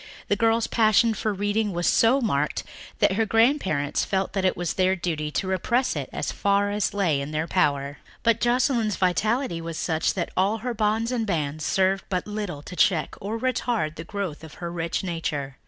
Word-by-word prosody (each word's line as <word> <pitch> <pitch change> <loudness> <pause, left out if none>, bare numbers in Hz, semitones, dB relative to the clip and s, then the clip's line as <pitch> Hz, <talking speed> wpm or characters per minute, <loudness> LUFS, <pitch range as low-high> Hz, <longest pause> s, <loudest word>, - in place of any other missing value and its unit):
The 205 - +3
girl's 225 +2 +2
passion 225 0 +3
for 215 0 -1
reading 205 +1 -1
was 175 0 -1
so 250 +5 +4
marked 150 - 0 0.3
that - - +3
her 220 +4 +1
grandparents 225 - +2
felt 190 -1 -1
that 195 -1 -1
it 185 - +1
was 175 -1 -2
their 185 0 +2
duty 160 -4 -2
to - - -1
repress 235 +7 0
it - - -4
as - - -3
far 200 0 +1
as 205 -1 -1
lay 170 -8 +1
in 140 - -5
their 155 +1 -1
power. 140 -3 0 0.2
But 230 -1 +3
Joscelyn's 240 -3 +2
vitality 195 +1 0
was 165 -1 -5
such 160 -1 0
that 175 -3 -2
all 195 +4 +2
her 245 - -1
bonds 220 +2 0
and 230 -3 -1
bands 155 -4 -2
served 190 +3 +1
but 185 -2 -1
little 205 -8 -5
to 180 - -9
check 175 -2 +2
or 210 +3 -3
retard 230 -8 -1
the 160 - -7
growth 190 -6 -5
of 160 - -11
her 170 -1 -5
rich 170 +1 -2
nature. 150 -6 -3
195 Hz, 195 wpm, -25 LUFS, 165-220 Hz, 0.3 s, so